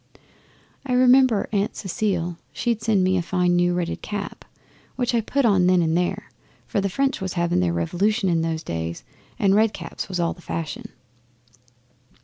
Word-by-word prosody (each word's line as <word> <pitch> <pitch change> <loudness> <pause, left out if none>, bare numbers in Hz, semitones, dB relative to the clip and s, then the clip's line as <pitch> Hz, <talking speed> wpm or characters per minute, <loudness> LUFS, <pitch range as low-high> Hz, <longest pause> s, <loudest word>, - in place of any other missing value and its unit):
I 265 -2 -2
remember 255 -3 +5
Aunt 205 -1 0
Cecile 185 -4 -2 0.2
she'd 235 -3 -1
sent 215 -3 +2
me 185 0 +2
a - - +1
fine 180 0 +1
new 175 0 +2
red 175 -1 -1
knitted - - -5
cap, 205 -1 -5 0.5
which 245 -1 -1
I 235 - +2
put 275 +5 0
on 190 -5 +4
then 180 -1 +4
and 160 0 +1
there, 175 0 -1 0.3
for 200 - -1
the 195 - -1
French 275 +4 0
was 190 -2 -3
having 170 - +1
their 90 -1 +1
Revolution 190 - 0
in 170 -2 +2
those 165 0 -2
days, 85 0 -4 0.3
and 195 -1 +3
red 215 +1 +3
caps - - -6
was 185 -2 -3
all 170 -1 +1
the 175 - -17
fashion. 165 -2 -5
185 Hz, 180 wpm, -23 LUFS, 170-215 Hz, 0.5 s, remember